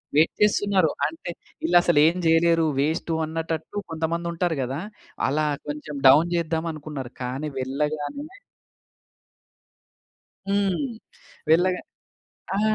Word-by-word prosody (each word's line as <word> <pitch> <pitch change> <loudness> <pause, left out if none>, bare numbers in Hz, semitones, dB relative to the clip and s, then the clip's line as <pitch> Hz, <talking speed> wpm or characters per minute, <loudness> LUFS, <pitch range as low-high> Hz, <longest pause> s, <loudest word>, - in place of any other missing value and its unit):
Wait 155 +2 +5
చేస్తున్నారు 200 -4 +3 0.2
అంతే. 165 +2 -7 0.3
ఈళ్ళసలు 175 -2 +4
ఏమి 170 +3 +2
జేయలేరు. 165 0 +4
వేస్టు 160 +3 0
అన్నటట్టు 160 +3 -4
కొంతమంది 165 +1 -2
ఉంటారు 170 -2 -1
గదా! 130 +3 -3 0.5
అలా 155 +3 +1 0.2
కొంచెం 150 0 -5
డౌన్ 155 +6 +6
జేద్దాం 165 -1 -1
అనుకున్నారు. 145 -4 -7
కానీ 135 +5 -3
వెళ్ళగానే 150 - -2 2.2
హ్మ్. 200 +2 +1 0.7
వెళ్ళగా 180 +3 +4 0.8
ఆ! 205 - +1
160 Hz, 100 wpm, -24 LUFS, 150-175 Hz, 2.2 s, డౌన్